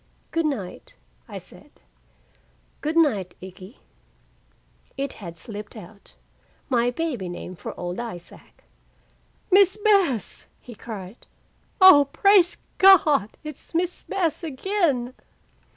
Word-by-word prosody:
"Good 330 -1 0
night," 215 -11 -6 0.3
I - - -8
said. - - -11 1.1
"Good 310 +2 -2
night, 215 - +1
Ikkie." 185 +4 -12 1.2
It 275 0 -3
had 170 -3 -9
slipped 210 +1 -9
out, 200 0 -13 0.5
my 245 -2 +2
baby 245 - -3
name 180 +1 -8
for - - -9
old 175 +2 -5
Isaac! 180 -8 -10 0.9
"Miss 385 +1 +5
Bess!" 390 - +1
he 245 - -12
cried. 210 -2 -10 0.5
"Oh, 295 -8 +8
praise 395 -2 +4 0.2
Gawd, 310 - +5
it's 305 +2 -10
Miss 355 +1 -1
Bess 355 -5 -2
again!" 295 -5 -1
265 Hz, 105 wpm, -24 LUFS, 205-340 Hz, 1.2 s, Oh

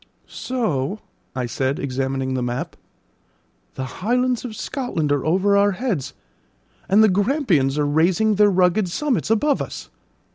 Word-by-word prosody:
"So," 210 - -2 0.4
I 130 -1 -2
said, 130 +3 -1
examining 135 0 -2
the 130 - -1
map, 120 0 -3 1.0
"the 130 - -4 0.2
Highlands 250 +3 +1
of 235 -4 -6
Scotland 215 - -3
are 145 -3 +1
over 190 +6 +2
our 200 0 +3
heads, 200 - -3 0.7
and 205 +3 +5
the - - +6
Grampians 195 - +1
are 150 - +1
raising 170 +9 +2
their 205 0 +4
rugged 185 +1 +2
summits 270 - -1
above 275 +6 +2
us." - - -7
190 Hz, 140 wpm, -21 LUFS, 140-220 Hz, 1.0 s, the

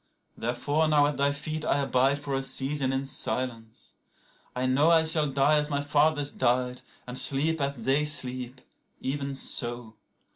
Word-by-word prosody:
105Therefore 145 +7 -1
now 150 -1 +4
at 145 0 -2
thy 140 0 +2
feet 155 +2 -5
I 155 - +1
abide 135 0 +1
for 145 -1 -6
a 135 - 0
season 135 0 -1
in 135 +1 -2
silence. 120 -4 -4 0.6
I 125 +1 -1
know106I 160 +5 +4
shall 155 -3 +1
die 140 +3 +2
as 150 0 -2
my 140 -1 -1
fathers 145 0 +1
died, 125 +1 0 0.2
and 125 +1 -1
sleep 155 +3 +3
as 140 0 -1
they 140 +3 +2
sleep; 130 -3 -2 0.4
even 140 +1 -4
so. 120 -3 -2
140 Hz, 155 wpm, -27 LUFS, 130-150 Hz, 0.6 s, now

